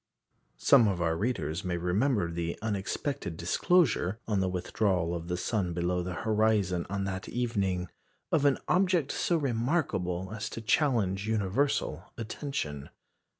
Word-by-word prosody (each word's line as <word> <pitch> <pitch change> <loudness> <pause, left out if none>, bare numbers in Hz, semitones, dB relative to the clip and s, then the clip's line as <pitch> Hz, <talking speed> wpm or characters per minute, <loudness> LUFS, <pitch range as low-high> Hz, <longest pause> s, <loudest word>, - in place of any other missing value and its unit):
Some 125 -6 +6
of 95 -3 0
our 80 -1 +1
readers 85 - -2
may 90 -2 -1
remember 90 +2 +1
the 85 0 -3
unexpected 100 - -2
disclosure, 110 - +2
on 105 -3 +1
the 95 -1 +1
withdrawal 90 -1 0
of 85 -1 -4
the 90 0 -1
sun 90 -2 -1
below 90 +1 0
the 90 +1 -4
horizon 105 -5 +2
on 100 0 -2
that 95 -1 -4
evening, 100 -7 -1 0.4
of 155 - +3
an 140 -2 +4
object 180 -5 +2
so 170 - +1
remarkable 115 - -1
as 110 +1 -4
to 115 - -6
challenge 110 -6 +1
universal 105 - 0
attention. 110 - -4
100 Hz, 140 wpm, -29 LUFS, 90-120 Hz, 0.4 s, Some